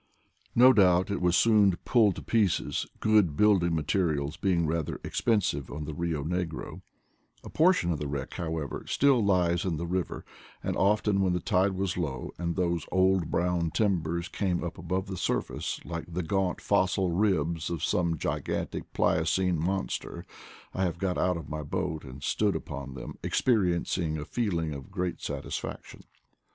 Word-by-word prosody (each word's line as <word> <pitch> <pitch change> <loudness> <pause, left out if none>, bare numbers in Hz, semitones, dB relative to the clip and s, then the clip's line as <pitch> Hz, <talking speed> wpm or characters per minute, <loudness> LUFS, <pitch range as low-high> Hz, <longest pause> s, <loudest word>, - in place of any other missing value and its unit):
No 130 +2 +8
doubt 95 -3 +4
it 100 - -2
was 90 -1 +3
soon 105 -5 +4
pulled 110 -7 +4
to - - -8
pieces, 105 -7 +1
good 105 -9 +3
building 95 -5 +4
mate 75 -2 -1
rial 75 -6 0
being 90 -4 +2
rather 80 -1 -2
expensive 95 - 0
on 75 +1 -5
the 75 - -5
Rio 80 -3 -2
Negro; 85 0 -4 0.6
a - - -9
portion 160 - +3
of 80 - -2
the 75 - -3
wreck, 70 -2 -4
however, 80 -3 -4
still 135 -5 +3
lies 90 -3 +2
in 90 -4 -1
the 85 - -3
river, 90 +1 -3 0.4
and - - -1
often, 105 0 +2
when 95 -2 +2
the 90 - 0
tide 95 +3 +1
was 95 -1 -2
low, 70 -8 -3
and 85 -1 -2
those 85 -3 -1
old 95 -2 +3
brown 85 -1 0
timbers 85 -3 0
came 90 -4 -1
up 85 - -5
above 90 +3 -2
the 95 -1 -6
surface, 90 - -2
like 85 0 -6
the 90 +2 -2
gaunt 95 +3 -1
fossil 95 -2 +1
ribs 85 -4 +1
of 85 -4 -4
some 85 -2 +1
gigantic - - -3
Pliocene 85 +2 +1
monster, 95 +4 -3 0.5
I 95 - -1
have 85 -2 -2
got 90 0 -1
out 90 -1 +1
of 80 -3 -8
my 75 +1 -4
boat 80 +1 -3
and 70 0 -10
stood - - +1
upon 70 -1 -6
them 60 - -8
experiencing 90 -7 +1
a 75 - -5
feeling 85 -10 -1
of 70 -2 -8
great 90 -2 -3
satis - - -4
faction. - - -9
90 Hz, 170 wpm, -28 LUFS, 80-95 Hz, 0.6 s, No